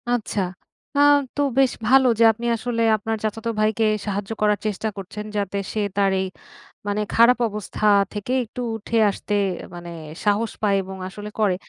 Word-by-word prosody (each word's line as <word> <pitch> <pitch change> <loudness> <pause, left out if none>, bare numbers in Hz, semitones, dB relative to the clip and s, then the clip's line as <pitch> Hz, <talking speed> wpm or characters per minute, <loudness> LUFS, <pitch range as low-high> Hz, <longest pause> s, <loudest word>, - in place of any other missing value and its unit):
আচ্ছা। 230 -4 0 0.6
আ - - +4 0.4
তো 290 - 0 0.2
বেশ 265 -2 +4 0.2
ভালো 265 +1 +6
যে - - +6
আপনি 230 +2 -7
আসলে 230 0 -2 0.2
আপনার 220 +1 -3
চাচাত 220 +1 -3
ভাইকে 215 +1 +2 0.2
সাহায্য 205 +1 -3
করার 210 -1 +3
চেষ্টা 215 +1 -1
করছেন 200 +2 -7
যাতে 200 -1 -2 0.2
সে 220 - -1 0.2
তার 200 -1 +3
এই 190 - 0 0.6
মানে 205 +1 0
খারাপ 235 +2 +6
অবস্থা 210 0 -4 0.3
থেকে 210 +3 -4
একটু 240 +2 -7
উঠে 225 +1 -2
আসতে 205 +1 -4 0.4
মানে 175 0 -8 0.4
সাহস 210 +2 +2
পায় 205 -2 +3
এবং 190 0 -8
আসলে 205 +2 -8
করে। 205 -4 +3
210 Hz, 165 wpm, -23 LUFS, 200-230 Hz, 0.6 s, ভালো